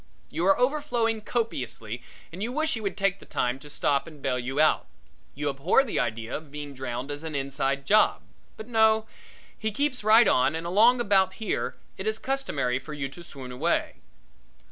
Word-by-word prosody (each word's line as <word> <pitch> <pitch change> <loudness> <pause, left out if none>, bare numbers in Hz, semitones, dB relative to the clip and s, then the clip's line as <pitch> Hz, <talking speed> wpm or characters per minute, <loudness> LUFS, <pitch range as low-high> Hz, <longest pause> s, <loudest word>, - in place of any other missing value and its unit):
You 175 - 0
are 195 - +5
overflowing 245 -5 +1
copiously 125 - -3 0.3
and 180 +3 -8
you 230 +3 -1
wish 310 +3 0
he 225 - -3
would 200 -2 -3
take 195 0 +1
the - - -14
time 125 +2 -1
to 150 - -12
stop 140 0 0
and 155 -3 -12
bail 125 -2 -1
you 135 +3 -3
out. 155 0 +3 0.5
You 145 +1 -2
abhor 145 - +3
the 245 - -2
idea 115 -1 -2
of 155 -1 -7
being 145 0 -7
drowned 130 +1 -4
as 145 0 -5
an 160 -2 -5
inside 140 0 -1
job. 215 +5 +4 0.3
But 220 - -8
no, 220 -2 +4 0.5
he 220 0 -2
keeps 270 0 -1
right 220 +1 +7
on 140 -2 +3
and 165 +1 -4
along 225 +8 +5
about 195 -4 +3
here 220 -3 -2 0.2
it 190 - -3
is 220 0 0
customary 145 - -1
for 150 +3 -8
you 140 -2 -3
to 170 +5 -11
swoon 135 -5 -8
away. 125 - 0
170 Hz, 190 wpm, -27 LUFS, 135-220 Hz, 0.5 s, right